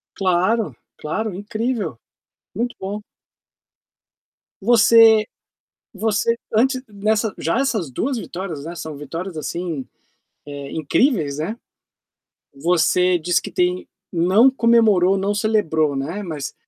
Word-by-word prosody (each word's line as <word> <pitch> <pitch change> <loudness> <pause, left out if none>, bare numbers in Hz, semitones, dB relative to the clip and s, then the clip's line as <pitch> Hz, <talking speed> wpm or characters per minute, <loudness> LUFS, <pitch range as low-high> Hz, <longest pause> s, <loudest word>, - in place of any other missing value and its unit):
Claro, 190 +4 +1 0.2
claro, 215 +7 -3
incrível. 215 - -3 0.6
Muito 240 +4 -2
bom. 200 +2 -4 1.6
Você 225 0 +6 0.7
você 220 +2 0 0.2
antes 255 +4 +2
nessa 215 +1 0
já 165 +7 -1
essas 225 - -1
2 250 - -2
vitórias, 175 -8 -6
né, 170 +1 -6
são 160 -3 -7
vitórias 165 +5 -6
assim, 160 -3 -4 0.6
eh, 140 -1 -7
incríveis, 160 - +1
né. 195 +10 -3 1.0
Você 175 +3 +2
diz 175 +2 +1
que - - -8
tem 180 0 0 0.2
não 185 +9 +4
comemorou, 225 -7 +4
não 195 +2 0
celebrou, 165 -9 +1
né, 160 +10 -4
mas 155 -7 -5
190 Hz, 110 wpm, -21 LUFS, 165-220 Hz, 1.6 s, Você